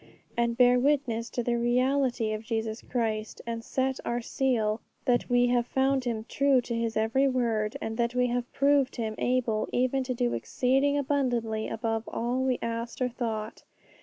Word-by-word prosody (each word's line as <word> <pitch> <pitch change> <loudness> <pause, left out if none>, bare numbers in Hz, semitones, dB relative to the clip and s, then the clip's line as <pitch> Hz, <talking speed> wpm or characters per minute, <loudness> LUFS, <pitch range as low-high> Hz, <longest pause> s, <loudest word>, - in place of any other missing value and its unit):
and 235 -1 0
bear 250 0 +6
witness 250 -4 +1
to 245 - -2
the 235 0 0
reality 250 -1 +1
of 215 - -3
Jesus 225 0 -3
Christ, 220 -3 -2
and 230 -1 -4
set 265 +2 -1
to - - -9
our 240 0 0
seal 230 -3 0 0.2
that 245 -2 +1
we 245 0 +4
have 245 -1 +2
found 265 0 +1
Him 225 -2 -2
true 275 0 +3
to 240 -1 -4
His 230 -1 -1
every 230 +5 +2
word, 230 -5 0
and 225 0 -4
that 235 0 0
we 250 0 +3
have 245 0 -2
proved 280 -1 +2
Him 220 -3 -2
able 240 -4 0
even 255 +2 +1
to 255 -1 -2
do 245 0 0
exceeding 260 - +1
abundantly 245 -6 0
above 225 0 -2
all 240 +2 -1
we 260 -2 +1
asked 230 0 -4
or 255 -1 +1
thought. 225 -3 -4
240 Hz, 180 wpm, -28 LUFS, 225-255 Hz, 0.2 s, bear